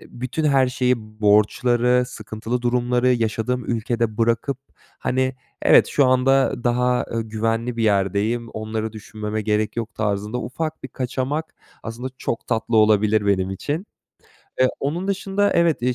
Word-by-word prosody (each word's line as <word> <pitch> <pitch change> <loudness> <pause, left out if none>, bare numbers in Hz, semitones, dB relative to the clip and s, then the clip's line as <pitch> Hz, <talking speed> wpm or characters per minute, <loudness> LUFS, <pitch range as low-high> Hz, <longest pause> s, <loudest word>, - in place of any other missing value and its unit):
eee, - - -14
bütün 130 +6 -4
her 135 -3 +4
şeyi, 125 0 +1 0.2
borçları, 120 +4 +3
sıkıntılı 115 0 -5
durumları 125 +1 +1
yaşadığım 120 0 0
ülkede 115 -1 -1
bırakıp; 115 +4 +1 0.4
hani, 130 0 0 0.3
evet, - - +6
şu 140 -3 +3
anda 130 0 +2
daha, 125 +1 +2
ııı, 115 - -1
güvenli 115 +2 -2
bir 115 - -1
yerdeyim, 105 +3 +1
onları 110 0 -4
düşünmeme 110 0 -5
gerek 105 +1 0
yok 115 -2 -4
tarzında 105 +2 -2
ufak 155 +7 -4
bir 135 - -6
kaçamak, 130 +5 -3 0.3
aslında 120 +3 -5
çok 115 - -3
tatlı 115 0 0
olabilir 105 -1 +4
benim 95 -2 +1
için. 150 - -3 0.7
Eee, 130 - +6
onun 170 +7 -2
dışında, 200 +1 +1
evet, 170 -6 +2
iii, 125 +1 +1
120 Hz, 145 wpm, -22 LUFS, 110-130 Hz, 0.7 s, evet